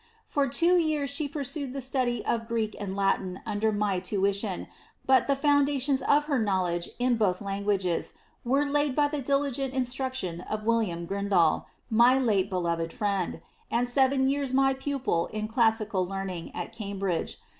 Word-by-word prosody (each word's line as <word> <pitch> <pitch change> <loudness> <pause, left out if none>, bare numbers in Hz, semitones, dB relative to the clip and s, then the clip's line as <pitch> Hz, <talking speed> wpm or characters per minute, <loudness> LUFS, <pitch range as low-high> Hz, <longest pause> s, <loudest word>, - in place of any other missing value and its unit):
For 285 -1 0
two 340 +7 +3
yeara 310 -4 +1
she 285 +2 -1
pursued 280 -2 -3
the 275 - -4
study 255 -3 -1
of 230 -1 -1
Greek 225 -2 -1
and 195 -2 -4
Latin 195 -2 0
under 215 0 0
my 205 -3 0
tuition, 195 +1 -1 0.4
but 260 -2 +4
the 280 - +3
foundations 280 -1 +2
of 290 +1 +3
her 290 -3 0
knowledge 185 -5 0
in 245 -1 +1
both 190 -5 +1
languages 195 -3 -1 0.3
were 275 +4 +2
laid 290 -1 0
by 295 -1 +3
the 295 -1 -3
diligent 275 -1 -1
instruction 255 -8 -2
of 215 0 -3
William 215 -7 0
Grindal, 195 -4 +1 0.3
my 240 +4 +6
late 210 -7 +1
beloved 170 -3 -1
friend, 200 -6 -2 0.3
and 240 +1 +1
seven 265 +1 +3
yeara 275 -1 0
my 270 0 +4
pupil 265 -10 -1
in 215 0 -4
classical 220 -4 +2
learning, 185 -2 -5
at 175 - -5
Cambridge. 195 -5 -3
230 Hz, 155 wpm, -27 LUFS, 195-270 Hz, 0.4 s, my